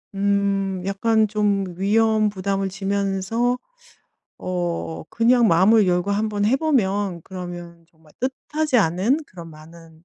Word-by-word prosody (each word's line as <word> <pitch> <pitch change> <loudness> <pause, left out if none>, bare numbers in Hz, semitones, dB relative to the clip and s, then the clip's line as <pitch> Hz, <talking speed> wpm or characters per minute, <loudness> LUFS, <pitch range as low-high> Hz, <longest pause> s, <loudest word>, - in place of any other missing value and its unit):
음 195 -1 0
약간 220 +3 +2
좀 205 -1 0
위험 215 +2 +2
부담을 195 0 -2
지면서 200 +5 -1 0.8
어 175 -2 -3
그냥 235 0 +3
마음을 195 +5 +5
열고 180 +3 0
한번 205 0 -1
해 235 +6 +3
보면 205 - 0
그러면 175 -2 -9
정말 160 -2 -24
뜻하지 270 +2 -1
않은 200 - +1
그런 170 -3 -11
많은 160 +1 -16
195 Hz, 235 characters per minute, -22 LUFS, 180-220 Hz, 0.8 s, 마음을